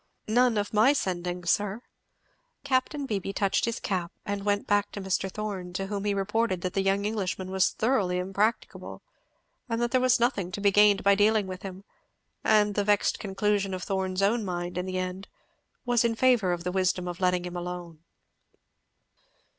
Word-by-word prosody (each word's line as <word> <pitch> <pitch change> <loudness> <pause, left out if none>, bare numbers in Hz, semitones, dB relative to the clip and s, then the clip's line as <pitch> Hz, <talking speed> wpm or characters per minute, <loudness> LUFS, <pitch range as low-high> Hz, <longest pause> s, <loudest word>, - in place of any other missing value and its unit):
"None, 240 +1 +3
of 205 +1 -2
my 220 +7 +5
sending, 180 -6 -3
sir." 205 +6 0 0.8
Capt. 265 +1 0
Beebee 195 -5 -3
touched 195 -2 +1
his 230 -1 -2
cap, 180 -3 -2
and 200 0 -3
went 205 0 0
back 205 0 +1
to - - -5
Mr. 190 0 -1
Thorn, 195 -4 -5
to 195 +1 -2
whom 200 0 -4
he 205 -1 +1
reported 200 -1 0
that 185 0 -3
the 195 - +1
young 195 +1 +1
Englishman 190 -3 -3
was 190 -1 +3
thoroughly 210 -7 0
impracticable, 195 +5 -2 0.7
and 230 0 -1
that 240 0 0
there 255 - +3
was 255 -1 +3
nothing 210 -7 0
to - - -3
be 200 0 +3
gained 205 0 +5
by 200 - +5
dealing 210 +1 +3
with 185 -1 -7
him; 190 0 -8 0.6
and 210 -1 +3
the 205 - 0
vexed 205 0 +2
conclusion 200 -1 -1
of 185 - -6
Thorn's 190 0 -1
own 220 +3 +2
mind, 175 -2 -4
in 180 +1 -3
the 185 0 -3
end, 185 +1 -4 0.6
was 245 -1 +2
in 230 -1 +1
favour 240 -6 +3
of 175 -1 -3
the 180 - -2
wisdom 185 -1 0
of 175 -1 -5
letting 180 -1 +1
him 180 0 -6
alone. 175 -2 -6
195 Hz, 185 wpm, -27 LUFS, 185-215 Hz, 0.8 s, my